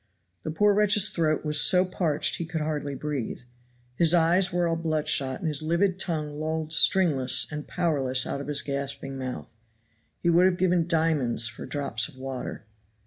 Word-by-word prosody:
The - - -5
poor 205 +6 +3
wretch's 210 0 +4
throat 155 -2 0
was 150 0 +2
so 185 0 +4
parched 165 -5 0
he 170 - -4
could 165 -1 -4
hardly 150 -2 -3
breathe. 140 -5 -4 0.5
His 165 +6 +3
eyes 175 +2 +3
were 175 -1 0
all 165 - 0
bloodshot 155 -5 -1
and 170 - -4
his 150 -2 -1
livid 175 +4 0
tongue 150 -5 -3
lolled 160 0 -2
stringless 155 -8 +3
and 150 0 -6
powerless 135 -7 0
out 140 - -4
of 140 - -8
his 145 -1 0
gasping 140 -1 -5
mouth. 130 -1 -6 0.6
He 170 - +1
would 175 +2 +5
have 180 -1 0
given 180 -2 +1
diamonds 155 -9 +1
for - - -9
drops 120 -6 -2
of - - -16
water. 130 -4 -6
155 Hz, 175 wpm, -26 LUFS, 140-170 Hz, 0.6 s, would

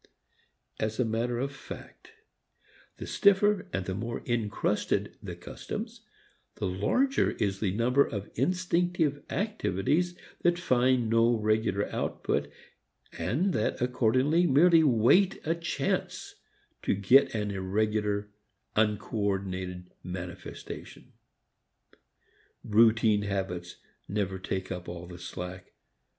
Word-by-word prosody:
As 110 0 -1
matter 120 0 0
of 135 +3 -2
fact, 140 - -11 0.8
the - - -6
stiffer 200 0 +3
and 95 -1 -2
the 95 - -3
more 115 +5 -4
encrusted 115 -4 -1
the - - -6
customs, - - -7 0.5
the - - -3
larger 105 - +1
is 95 -2 -1
the 100 -3 0
number 125 +6 +3
of 100 -5 -6
instinctive 175 0 +1
activities 175 - 0 0.2
that 175 0 +3
find 130 -6 +2
no 115 +1 +3
regular 110 -2 +1
outlet - - -1 0.7
and 135 - 0
that 110 - 0
accordingly 130 +7 +2
merely 165 +4 +6
await 150 - +4
a 160 - +2
chance 170 0 -2 0.5
to - - +1
get 115 +7 +5
an 105 -1 -1
irregular, 105 +1 -1 0.4
uncoordinated 100 -4 -1
manifestation. 90 -1 -8 1.5
Routine 110 -1 +4
habits 95 -4 -3 0.3
never 95 -2 -2
take 95 0 -4
up 90 -1 -5
all 85 0 -7
the 90 0 -10
slack. 90 +1 -7
110 Hz, 105 wpm, -29 LUFS, 95-140 Hz, 1.5 s, merely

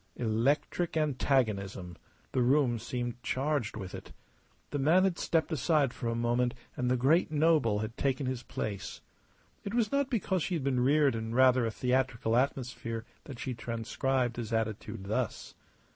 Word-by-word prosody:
Electric 135 +9 0
antagonism 110 - 0 0.4
the 130 - +1
room 125 -2 +3
seemed 120 +1 -4
charged 135 -4 -1
with 95 -3 -7
it. - - -9 0.6
The 145 - -1
man 160 +7 +4
had 190 -2 +1
stepped 165 0 0
aside 150 -3 +2
for 120 - -5
a 115 - -1
moment 120 +1 +1 0.2
and 125 -1 -1
the 125 - +2
great 145 +8 +3
noble 150 -9 +3
had 110 +2 -5
taken 135 0 0
his 130 -2 -2
place. 100 -4 -5 0.6
It 200 +3 -4
was 230 -3 +1
not 280 -1 +1
because 190 -6 0
she 180 - -1
had 155 - -2
been 130 -2 +1
reared 140 +2 +4
in 115 0 -4
rather 130 -2 +5
a - - -2
theatrical 125 -2 0
atmosphere 120 -3 -1 0.2
that 135 -4 -8
she 125 +1 -4
transcribed 120 +2 -1
his 115 -2 -4
attitude 110 -3 -2
thus. 110 +3 -3
125 Hz, 160 wpm, -30 LUFS, 115-145 Hz, 0.6 s, rather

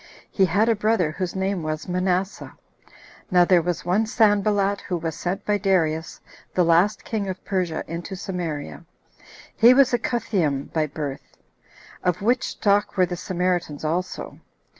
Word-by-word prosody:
He 195 - +3
had 200 +6 +2
a 230 - +3
brother, 210 -6 +1
whose 180 +3 -4
name 190 -1 -1
was 155 0 -4
Manasseh. 185 +1 -2 0.7
Now 180 -3 +5
there 175 -1 +4
was 175 0 -3
one 200 +5 +1
Sanballat, 205 -2 +2
who 180 - -3
was 165 -1 -3
sent 180 +5 -4
by 205 -1 +1
Darius, 165 -5 0 0.4
the 180 - +4
last 175 +6 +3
king 205 -3 -2
[of 185 - -7
Persia], 180 -5 -1
into 170 +4 -6
Samaria. 175 -5 -5 0.7
He 240 +2 +7
was 270 -1 +4
a 240 - +3
Cutheam 180 - -1
by 155 -1 +1
birth; 145 -2 -7 0.7
of 180 +1 0
which 245 +4 +2
stock 205 0 0
were 185 - +5
the 175 0 -4
Samaritans 175 -4 -2
also. 175 +4 -3
185 Hz, 155 wpm, -23 LUFS, 170-205 Hz, 0.7 s, He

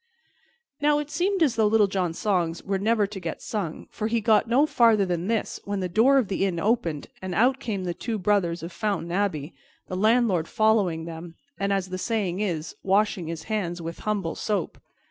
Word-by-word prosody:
Now 295 0 +4
it 295 0 -4
seemed 375 +1 +1
as 265 -6 +2
though 220 -2 +4
Little 215 0 +4
John's 185 -4 -2
songs 175 -6 0
were 195 -1 -1
never 215 +1 +2
to 200 0 -7
get 170 -3 -5
sung, 190 -8 -4
for 215 - -3
he 230 - -1
had 225 - 0
got 220 0 +4
no 265 +5 +4
farther 230 -8 +4
than 175 0 -2
this 225 -1 -1
when 200 0 -3
the 185 - -1
door 230 +10 +4
of 255 -6 +2
the 195 0 -1
inn 185 -4 0
opened 175 -7 0 0.2
and 185 -1 -4
out 255 +4 +3
came 210 -7 -3
the 175 -1 -2
two 225 +5 -3
brothers 180 -4 +1
of 170 - -6
Fountain 195 -2 -2
Abbey, 175 -6 -1 0.3
the 185 - -5
landlord 215 -4 +2
following 205 -7 +2
them, 165 0 -8 0.2
and, 200 0 0
as 195 -2 0
the 185 0 -4
saying 200 -5 -1
is, 170 -6 -2
washing 195 -3 +1
his 165 -1 -5
hands 190 -6 -2
with 165 0 -6
humble 200 -6 -2
soap. 205 -5 -2
200 Hz, 205 wpm, -25 LUFS, 175-220 Hz, 0.3 s, Now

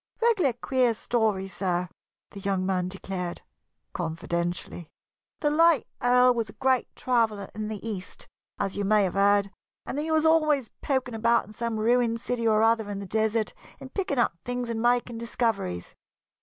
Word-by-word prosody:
"Regular 425 - +3
queer 245 0 +1
story, 215 -5 0
sir," 180 -1 -1 0.4
the 200 - -9
young 195 -1 -1
man 185 -1 0
declared, 185 -2 -5 0.5
confidentially. 170 0 -3 0.5
"The 295 -2 +2
late 330 -2 +4 0.2
Earl 250 0 +5
was 230 -3 -2
a - - -11
great 260 -1 +1
traveller 225 -5 0
in 215 0 -4
the 215 +1 -6
East, 195 -4 -6 0.3
as 195 - -1
you 205 - -1
may 210 +1 +4
have 185 - -1
heard, 200 0 +3 0.3
and 285 - -3
he 310 +2 -2
was 315 0 +2
always 305 -6 +3
poking 260 -3 -1
about 235 +1 +2
in 210 - -13
some 230 0 -3
ruined 230 +1 +2
city 235 -1 -1
or 215 0 +4
other 225 -2 +2
in 205 - -4
the 200 - -5
desert, 220 +2 0 0.3
and 265 - -11
picking 370 -9 -1
up 240 - +2
things 245 -1 -3
and 225 -1 -2
making 240 -1 +1
discoveries. 225 - -2
225 Hz, 170 wpm, -27 LUFS, 195-250 Hz, 0.5 s, Earl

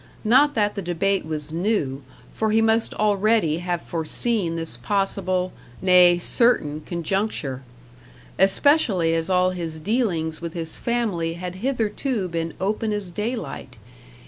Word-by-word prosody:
Not 265 +6 +4
that 210 -2 +1
the 200 - -4
debate 185 +1 -1
was 155 -1 -3
new, 165 -7 -1 0.3
for 220 - 0
he 220 +1 +3
must 225 0 +2
already 210 -5 +2
have 175 -1 -3
foreseen 170 +2 -1
this 165 -6 0
possible, 185 +5 -1 0.3
nay, 180 -1 +6
certain, 170 - +1
conjuncture. 170 -6 -2 0.8
Especially 195 - +3
as 165 +1 -1
all 185 0 +3
his 165 -3 -5
dealings 165 -6 -1
with 170 -1 -5
his 165 -1 -5
family 210 -9 -1
had 180 +1 -6
hitherto 235 -3 -1
been 165 -1 -4
open 215 +3 -1
as 205 -4 -3
daylight. 210 - -5
185 Hz, 130 wpm, -23 LUFS, 165-215 Hz, 0.8 s, nay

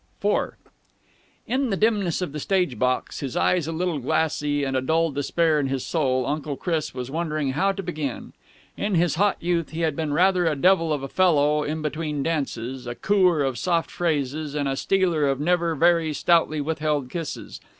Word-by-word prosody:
IV - - +1 0.9
In 260 +1 0
the 195 - 0
dimness 205 -5 +1
of 175 - -4
the 150 - -5
stage 180 - 0
box, 130 0 0
his 135 -4 -4
eyes 175 -4 +2
a - - -2
little 170 -1 -1
glassy 145 +1 0
and 135 -1 -1
a 130 - +1
dull 160 +4 +1
despair 155 +3 +1
in 140 - 0
his 135 -1 -2
soul, 130 -6 0
Uncle 145 +1 -2
Chris 165 -4 -2
was 125 0 -5
wondering 155 -3 -1
how 190 +9 +1
to 195 0 -5
begin. 155 -7 -5 0.4
In 205 -1 -1
his 170 -2 +2
hot 200 +4 +2
youth 170 -2 0
he 160 +1 -5
had 160 -3 0
been 155 -1 -2
rather 180 +2 +3
a 155 - +1
devil 165 +1 +3
of 145 -3 -1
a - - -3
fellow 150 -4 +3
in 155 +1 -3
between 150 -1 -2
dances, 130 -5 -3
a 120 - -4
coo 195 +3 +3
er 160 -5 +2
of 130 -4 -2
soft 170 +3 0
phrases 150 -2 -2
and 145 -1 0
a 135 - -1
stealer 175 -3 +1
of 135 -1 0
never 170 +1 +1
very 165 0 +3
stoutly 155 -1 +2
withheld 150 -3 -1
kisses. 165 -3 -6
155 Hz, 195 wpm, -24 LUFS, 140-175 Hz, 0.9 s, rather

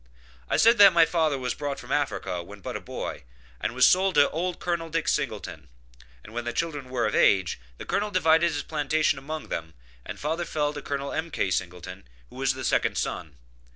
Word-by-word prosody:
I - - +2
said 230 0 +5
that 200 -1 +9
my 170 -1 +6
father 160 -3 +1
was 125 -1 -2
brought 145 -2 -4
from 125 - -10
Africa 140 -11 -1
when 100 +4 -12
but - - -6
a - - -2
boy, - - -6 0.4
and 115 - -3
was 130 - +6
sold 190 0 +3
to 145 -1 +5
old 175 +3 -2
Col. 170 -2 -2
Dick 165 0 -2
Singleton; - - -2 0.6
and 110 - -13
when 120 +1 -3
the 120 - -3
children 145 -6 -3
were 125 -2 0
of 105 - -1
age, 95 -8 +3 0.2
the - - -8
Colonel 210 +1 -1
divided 170 -3 +3
his 145 -2 -3
plantations 155 -1 0
among 155 +3 -6
them, 80 0 -5 0.3
and - - -8
father 160 +4 -2
fell 150 -2 -1
to 145 - -6
Col. 140 0 -4
M.K. 160 - -2
Singleton, 90 -5 -4 0.2
who - - -12
was - - +1
the - - -6
second - - +1
son. 75 -3 -3
145 Hz, 205 wpm, -26 LUFS, 125-165 Hz, 0.6 s, that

